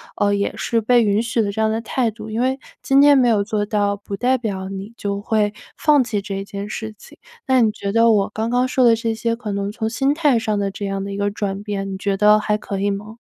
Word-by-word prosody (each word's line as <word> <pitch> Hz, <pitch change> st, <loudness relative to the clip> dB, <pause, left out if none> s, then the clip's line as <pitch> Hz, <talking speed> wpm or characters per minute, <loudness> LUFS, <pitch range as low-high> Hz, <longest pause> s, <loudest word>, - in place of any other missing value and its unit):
呃 205 Hz, 0 st, +1 dB
也 200 Hz, 0 st, -1 dB
是 230 Hz, -, 0 dB
被 235 Hz, +2 st, +3 dB
允 205 Hz, 0 st, +2 dB
许 230 Hz, 0 st, 0 dB
的 205 Hz, -2 st, -1 dB
这 220 Hz, -, -3 dB
样 220 Hz, -, +2 dB
的 220 Hz, +1 st, -1 dB
态 235 Hz, +1 st, 0 dB
度， 215 Hz, 0 st, -9 dB
因 220 Hz, +1 st, -3 dB
为 260 Hz, +2 st, +1 dB, 0.2 s
今 275 Hz, +1 st, +4 dB
天 285 Hz, 0 st, +7 dB
没 255 Hz, -2 st, +4 dB
有 215 Hz, -4 st, +3 dB
做 205 Hz, 0 st, -1 dB
到， 205 Hz, -1 st, 0 dB
不 200 Hz, 0 st, -7 dB
代 250 Hz, +5 st, +1 dB
表 195 Hz, -5 st, -4 dB
你 195 Hz, +3 st, -7 dB
就 200 Hz, -3 st, -3 dB
会 210 Hz, 0 st, 0 dB, 0.2 s
放 300 Hz, -2 st, +4 dB
弃 215 Hz, -3 st, -2 dB
这 195 Hz, 0 st, -5 dB
件 200 Hz, +1 st, -6 dB
事 220 Hz, 0 st, -6 dB
情。 -, -, -16 dB, 0.3 s
那 260 Hz, -1 st, +4 dB
你 225 Hz, -3 st, +4 dB
觉 200 Hz, -2 st, -4 dB
得 230 Hz, +2 st, +4 dB
我 205 Hz, -2 st, +2 dB
刚 220 Hz, +1 st, -2 dB
刚 245 Hz, +1 st, +2 dB
说 255 Hz, -1 st, +3 dB
的 230 Hz, -1 st, +6 dB
这 225 Hz, 0 st, -2 dB
些 230 Hz, +1 st, -1 dB
可 230 Hz, -3 st, -6 dB
能 200 Hz, 0 st, -2 dB
从 220 Hz, +1 st, -3 dB
心 270 Hz, +5 st, +1 dB
态 295 Hz, -6 st, +2 dB
上 215 Hz, -2 st, -1 dB
的 200 Hz, -1 st, -1 dB
这 200 Hz, +1 st, -6 dB
样 195 Hz, 0 st, -3 dB
的 200 Hz, -, -5 dB
一 195 Hz, -, -5 dB
个 200 Hz, 0 st, 0 dB
转 200 Hz, -1 st, -4 dB
变， 200 Hz, -2 st, -4 dB
你 190 Hz, -, -4 dB
觉 200 Hz, 0 st, -1 dB
得 210 Hz, +1 st, +5 dB
还 210 Hz, 0 st, 0 dB
可 200 Hz, -2 st, -5 dB
以 200 Hz, +1 st, +1 dB
吗？ 210 Hz, +3 st, -5 dB
215 Hz, 290 characters per minute, -20 LUFS, 200-230 Hz, 0.3 s, 天